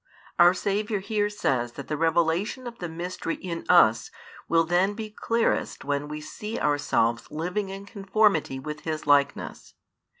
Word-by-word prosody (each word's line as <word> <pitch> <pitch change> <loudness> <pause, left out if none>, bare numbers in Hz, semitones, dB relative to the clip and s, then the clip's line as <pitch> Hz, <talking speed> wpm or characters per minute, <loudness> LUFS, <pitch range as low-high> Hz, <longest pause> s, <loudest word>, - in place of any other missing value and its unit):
Our 175 +1 +7
Saviour 205 +2 -1
here 205 +1 -1
says 125 - -1
that 140 - -8
the 155 - -2
revelation 165 - +1
of 235 -1 -8
the 175 - -4
mystery 170 0 -4
in 170 -2 -6
us 115 -11 +5 0.4
will 165 0 +4
then 180 +5 +1
be 215 -1 -6
clearest 230 - -1
when 145 +1 -1
we 150 0 -5
see 210 +8 -6
ourselves 145 -6 +1
living 180 +6 -3
in 195 +1 -7
conformity 200 - +1
with 150 +3 -6
His 155 0 -4
likeness. 140 -1 +1
175 Hz, 155 wpm, -26 LUFS, 150-205 Hz, 0.4 s, Our